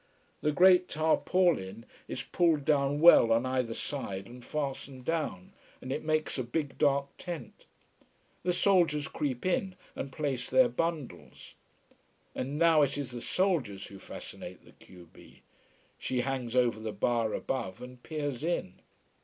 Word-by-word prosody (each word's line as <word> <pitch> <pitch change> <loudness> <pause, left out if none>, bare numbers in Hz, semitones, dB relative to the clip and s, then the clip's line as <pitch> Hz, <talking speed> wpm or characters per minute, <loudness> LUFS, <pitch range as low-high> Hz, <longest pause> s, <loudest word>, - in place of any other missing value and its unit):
The 150 - +2
great 180 +2 +6
tarpaulin 155 - +1 0.2
is - - -5
pulled 160 -5 +1
down 145 -1 +2
well 165 -9 +8
on 115 +2 +3
either 130 -3 -1
side 100 -9 -4
and 120 +3 -12
fastened 135 -3 -4
down, 155 - -2 0.3
and 130 - -7
it - - -2
makes 155 -2 0
a - - 0
big 140 +3 -3
dark 140 -1 +2
tent. 175 -3 -8 0.7
The 180 - +1
soldiers 175 -5 +3
creep 140 -4 -3
in 185 +1 0 0.2
and 135 - -5
place 135 -3 -3
their 260 -2 +5
bundles. 165 - -4 0.8
And 140 +3 -3
now 165 -1 +5
it 140 -1 +1
is 140 -3 -4
the 120 -1 -6
soldiers 135 - 0
who 100 - -11
fascinate - - -9
the - - -16
q 90 -2 -16
b. - - -17 0.6
She 125 -1 -1
hangs 125 -2 -3
over 120 -3 +3
the 110 0 -4
bar 115 -1 0
above, 115 -6 -3
and 125 0 -11
peers 145 -3 -4
in. 165 - -2
140 Hz, 150 wpm, -30 LUFS, 120-160 Hz, 0.8 s, well